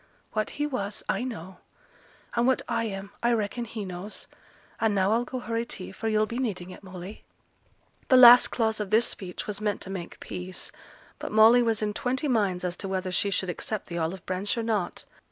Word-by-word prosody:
What 215 Hz, -1 st, 0 dB
he 295 Hz, -, +1 dB
was, 210 Hz, -8 st, -3 dB
I -, -, 0 dB
know; 190 Hz, -7 st, -7 dB, 0.7 s
and 240 Hz, +1 st, +2 dB
what 260 Hz, -, +2 dB
I 230 Hz, -1 st, 0 dB
am, 200 Hz, -1 st, -5 dB
I 240 Hz, 0 st, +3 dB
reckon 230 Hz, +2 st, -1 dB
he 220 Hz, -2 st, -5 dB
knows. 185 Hz, +3 st, -6 dB, 0.5 s
And 220 Hz, -2 st, +2 dB
now 190 Hz, +1 st, +3 dB
I'll 235 Hz, +2 st, +2 dB
go 255 Hz, -, -5 dB
hurry 230 Hz, -1 st, -2 dB
tea, 190 Hz, -6 st, -7 dB
for 225 Hz, +4 st, -5 dB
yo'll 215 Hz, 0 st, +3 dB
be 235 Hz, +3 st, -4 dB
needing 185 Hz, -8 st, -3 dB
it, -, -, -11 dB
Molly!' 185 Hz, +1 st, -9 dB, 0.8 s
The 255 Hz, -, +6 dB
last 245 Hz, 0 st, +10 dB
clause 220 Hz, -2 st, 0 dB
of 210 Hz, -2 st, -3 dB
this 220 Hz, +3 st, +4 dB
speech 180 Hz, -2 st, -4 dB
was 210 Hz, 0 st, -5 dB
meant 210 Hz, -1 st, 0 dB
to 190 Hz, -, -5 dB
make 180 Hz, -3 st, -6 dB
peace; 180 Hz, +1 st, -5 dB, 0.5 s
but -, -, -5 dB
Molly 220 Hz, +3 st, +7 dB
was 225 Hz, -2 st, +1 dB
in 210 Hz, 0 st, -1 dB
twenty 260 Hz, +7 st, -1 dB
minds 200 Hz, -8 st, +1 dB
as 175 Hz, -1 st, -2 dB
to 195 Hz, -, -4 dB
whether 190 Hz, -1 st, -2 dB
she 200 Hz, +2 st, +1 dB
should 190 Hz, -1 st, -1 dB
accept 210 Hz, +3 st, -5 dB
the 170 Hz, 0 st, -3 dB
olive 170 Hz, +3 st, -3 dB
branch 185 Hz, +4 st, -1 dB
or 230 Hz, -, -1 dB
not. 215 Hz, -5 st, -1 dB
210 Hz, 210 wpm, -27 LUFS, 190-230 Hz, 0.8 s, last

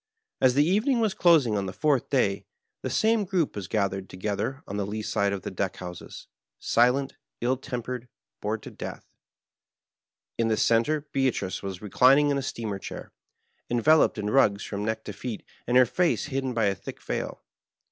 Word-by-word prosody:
As 130 Hz, -1 st, +5 dB
the 145 Hz, +1 st, +5 dB
evening 215 Hz, +8 st, +2 dB
was 220 Hz, -4 st, +1 dB
dosing 155 Hz, -11 st, +4 dB
on 100 Hz, -1 st, -1 dB
the -, -, -3 dB
fonrth 145 Hz, +2 st, +1 dB
day 100 Hz, -8 st, +1 dB, 0.3 s
the -, -, -3 dB
same 220 Hz, -1 st, +2 dB
gronp 180 Hz, -5 st, 0 dB
was 100 Hz, -3 st, -5 dB
gathered 95 Hz, -2 st, -1 dB
together 105 Hz, +8 st, -3 dB
on 100 Hz, -, -4 dB
the 100 Hz, -, -1 dB
lee 110 Hz, +1 st, -4 dB
side 100 Hz, -2 st, 0 dB
of 100 Hz, -1 st, -4 dB
the -, -, -4 dB
deck 95 Hz, +1 st, -2 dB
honses, 90 Hz, -1 st, -9 dB, 0.3 s
silent, 130 Hz, +4 st, +2 dB, 0.2 s
ill 125 Hz, +2 st, +1 dB
tempered, 125 Hz, -2 st, -5 dB, 0.3 s
bored -, -, -2 dB
to -, -, -8 dB
death. -, -, -7 dB, 1.3 s
In 115 Hz, -, +2 dB
the 110 Hz, -1 st, +1 dB
center 120 Hz, +7 st, +2 dB
Beatrice 130 Hz, -8 st, 0 dB
was 95 Hz, -1 st, -6 dB
reclining 135 Hz, +8 st, +5 dB
in 140 Hz, -, +1 dB
a -, -, -2 dB
steamer 110 Hz, -6 st, -4 dB
chair, -, -, -8 dB, 0.6 s
enveloped 145 Hz, +6 st, +4 dB
in 105 Hz, 0 st, -2 dB
rugs 100 Hz, -7 st, +3 dB
from 100 Hz, 0 st, -4 dB
neck 110 Hz, +1 st, -2 dB
to 105 Hz, -, -6 dB
feet, 110 Hz, +2 st, -6 dB, 0.2 s
and 125 Hz, +1 st, +4 dB
her 130 Hz, -, +7 dB
face 170 Hz, +9 st, +1 dB
hidden 135 Hz, -3 st, -2 dB
by 115 Hz, -2 st, +2 dB
a 100 Hz, -, +2 dB
thick -, -, -9 dB
veil. -, -, -4 dB
120 Hz, 180 wpm, -27 LUFS, 100-140 Hz, 1.3 s, her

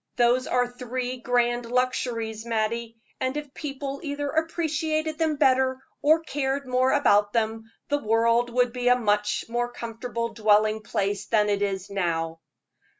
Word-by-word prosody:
Those 245 Hz, +1 st, +3 dB
are 250 Hz, 0 st, +2 dB
three 250 Hz, +1 st, -4 dB
grand 240 Hz, -1 st, +1 dB
luxuries, 235 Hz, -3 st, -1 dB
Mattie, 230 Hz, 0 st, -2 dB, 0.2 s
and 260 Hz, +2 st, -1 dB
if 295 Hz, -2 st, -6 dB
people 275 Hz, -1 st, -5 dB
either 285 Hz, -2 st, -3 dB
appreciated 315 Hz, -1 st, -1 dB
them 315 Hz, -2 st, +1 dB
better, 260 Hz, -2 st, +3 dB, 0.2 s
or 310 Hz, +2 st, +4 dB
cared 275 Hz, -2 st, -2 dB
more 255 Hz, +1 st, +2 dB
about 205 Hz, -7 st, +3 dB
them, 225 Hz, -1 st, -1 dB, 0.2 s
the 290 Hz, 0 st, +1 dB
world 230 Hz, +1 st, +2 dB
would 245 Hz, 0 st, +1 dB
be 245 Hz, -1 st, -2 dB
a 250 Hz, -, +7 dB
much 210 Hz, -3 st, 0 dB
more 240 Hz, +1 st, -1 dB
comfortable 235 Hz, 0 st, -4 dB
dwelling 215 Hz, -1 st, +2 dB
place 205 Hz, -2 st, -2 dB
than 210 Hz, -2 st, +2 dB
it 200 Hz, -1 st, 0 dB
is 195 Hz, -1 st, -2 dB
now." 165 Hz, -4 st, -1 dB
245 Hz, 150 wpm, -26 LUFS, 220-265 Hz, 0.2 s, a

